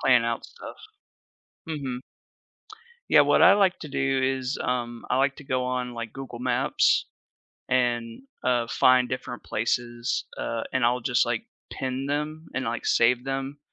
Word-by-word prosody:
plan 125 Hz, -3 st, +4 dB
out 115 Hz, 0 st, -2 dB
stuff. -, -, -10 dB, 0.9 s
Mhm. 135 Hz, -5 st, -4 dB, 1.1 s
Yeah, -, -, +7 dB
what -, -, +3 dB
I -, -, +8 dB
like 195 Hz, -3 st, +3 dB
to 155 Hz, -, -7 dB
do 135 Hz, -1 st, 0 dB, 0.2 s
is, 130 Hz, +2 st, -3 dB
um, 120 Hz, -2 st, -2 dB
I 125 Hz, -, +3 dB
like 135 Hz, 0 st, +2 dB
to 150 Hz, -, -12 dB
go 130 Hz, -1 st, -1 dB
on, 125 Hz, -1 st, -2 dB
like, 115 Hz, -2 st, -6 dB
Google 130 Hz, -3 st, -8 dB
Maps 125 Hz, +1 st, +2 dB, 0.6 s
and, 120 Hz, -, 0 dB, 0.2 s
uh, 120 Hz, -2 st, +1 dB
find 125 Hz, -1 st, +4 dB
different 125 Hz, -1 st, -5 dB
places, 120 Hz, +2 st, -1 dB
uh, 115 Hz, -1 st, -2 dB
and 130 Hz, -2 st, 0 dB
I'll 125 Hz, +1 st, +2 dB
just, 125 Hz, 0 st, +2 dB
like, 120 Hz, -1 st, -1 dB, 0.3 s
pin 130 Hz, +1 st, -3 dB
them 150 Hz, +2 st, -3 dB
and, 130 Hz, -, -1 dB
like, 115 Hz, -1 st, -3 dB
save 120 Hz, +2 st, +3 dB
them, 135 Hz, +1 st, -3 dB
125 Hz, 155 wpm, -26 LUFS, 120-135 Hz, 1.1 s, I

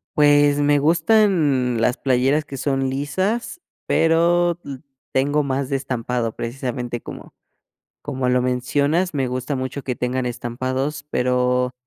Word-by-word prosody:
Pues 145 Hz, -1 st, +5 dB
me 145 Hz, 0 st, +3 dB
gustan, 160 Hz, -, +2 dB
las 120 Hz, +2 st, +1 dB
playeras 135 Hz, +3 st, +1 dB
que 140 Hz, -1 st, -8 dB
son 135 Hz, 0 st, 0 dB
lisas, 190 Hz, -, -2 dB, 0.2 s
pero, 170 Hz, +1 st, +3 dB
mm, 140 Hz, -, -6 dB, 0.4 s
tengo 145 Hz, +3 st, +1 dB
más 135 Hz, -1 st, -2 dB
de 140 Hz, -, 0 dB
estampado, 125 Hz, -3 st, -2 dB
precisamente, 120 Hz, -1 st, -4 dB
como -, -, -10 dB, 0.7 s
como 130 Hz, -1 st, -2 dB
lo 125 Hz, 0 st, +3 dB
mencionas, 140 Hz, +8 st, 0 dB
me 135 Hz, -2 st, 0 dB
gusta 130 Hz, +3 st, -3 dB
mucho 130 Hz, +2 st, -4 dB
que 125 Hz, -2 st, -3 dB
tengan 125 Hz, +1 st, -2 dB
estampados, 130 Hz, +5 st, -3 dB
pero 125 Hz, 0 st, +1 dB
135 Hz, 130 wpm, -21 LUFS, 125-150 Hz, 0.7 s, Pues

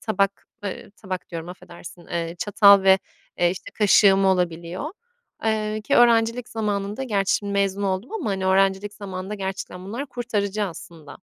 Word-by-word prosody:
tabak, 200 Hz, -2 st, -1 dB, 0.2 s
ııı, 200 Hz, -, -6 dB
tabak 190 Hz, -3 st, -7 dB
diyorum, 165 Hz, -1 st, -6 dB
affedersin, 175 Hz, -1 st, -12 dB
eee, 170 Hz, 0 st, -3 dB
çatal 200 Hz, +1 st, +6 dB
ve, 190 Hz, 0 st, +6 dB, 0.4 s
eee, 175 Hz, 0 st, +3 dB
işte, 190 Hz, +2 st, -7 dB
kaşığım 195 Hz, -1 st, +5 dB
olabiliyor. 180 Hz, -, -1 dB, 0.5 s
Eee, 215 Hz, -1 st, 0 dB
ki 280 Hz, -, +1 dB
öğrencilik 230 Hz, 0 st, +4 dB
zamanında, 210 Hz, +1 st, -2 dB
gerçi 205 Hz, -4 st, 0 dB
mezun 200 Hz, 0 st, 0 dB
oldum 195 Hz, -, -2 dB
ama, 355 Hz, -, -2 dB
hani, 190 Hz, -1 st, -2 dB
öğrencilik 195 Hz, +2 st, +2 dB
zamanında 195 Hz, 0 st, -6 dB
gerçekten 190 Hz, -2 st, -5 dB
bunlar 235 Hz, +9 st, -5 dB
kurtarıcı 215 Hz, -5 st, -2 dB
aslında. 165 Hz, -4 st, -10 dB
195 Hz, 145 wpm, -23 LUFS, 185-215 Hz, 0.5 s, çatal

